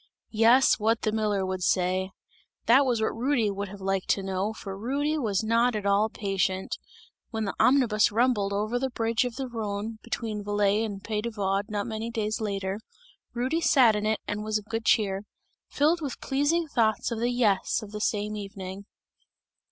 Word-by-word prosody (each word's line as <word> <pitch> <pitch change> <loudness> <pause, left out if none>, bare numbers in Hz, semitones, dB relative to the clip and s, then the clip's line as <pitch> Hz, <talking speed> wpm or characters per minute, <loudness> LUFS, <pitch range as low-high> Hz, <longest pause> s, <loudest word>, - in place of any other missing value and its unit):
Yes, 235 +5 +5
what 225 +2 +1
the 215 - +1
miller 210 -3 0
would 185 0 -3
say! 185 +1 +1 0.6
That 265 +4 +5
was 240 -3 +1
what - - -1
Rudy 235 -3 +1
would 200 +1 -4
have 200 +1 -10
liked 195 0 -1
to 195 - +2
know, 190 +2 -1
for 195 -3 -7
Rudy 280 +9 -1
was 220 -9 0
not 230 +2 +2
at 210 -1 -3
all 200 +2 +3
patient. 195 -2 -1 0.5
When 220 -2 -2
the 200 - -2
omnibus 245 -7 +4
rumbled 220 -3 +2
over 215 +4 -1
the 265 +1 -1
bridge 230 -1 0
of 245 -2 -4
the 270 -1 -4
Rhone, 220 -1 -4
between 215 -3 -4
Valais 205 +1 +1
and 200 -3 -5
Pays 210 -1 -2
de 235 - -3
Vaud 200 -2 -1
not 205 -1 -2
many 220 0 -4
days 220 -2 -2
after, 195 -1 -2 0.6
Rudy 260 +8 0
sat 260 -8 +5
in 210 0 -1
it 215 0 +1
and 210 0 -3
was 215 0 0
of 210 - -8
good 225 +1 -4
cheer; 195 -3 +2 0.5
filled 315 +4 +2
with 280 -5 -4
pleasing 290 +5 +1
thoughts 230 -4 +1
of 230 - -2
the 240 +1 +1
"Yes," 225 -3 +1
of 205 - -10
the 210 0 -5
same 210 0 -1
evening. 195 -1 -7
215 Hz, 190 wpm, -27 LUFS, 200-235 Hz, 0.6 s, Yes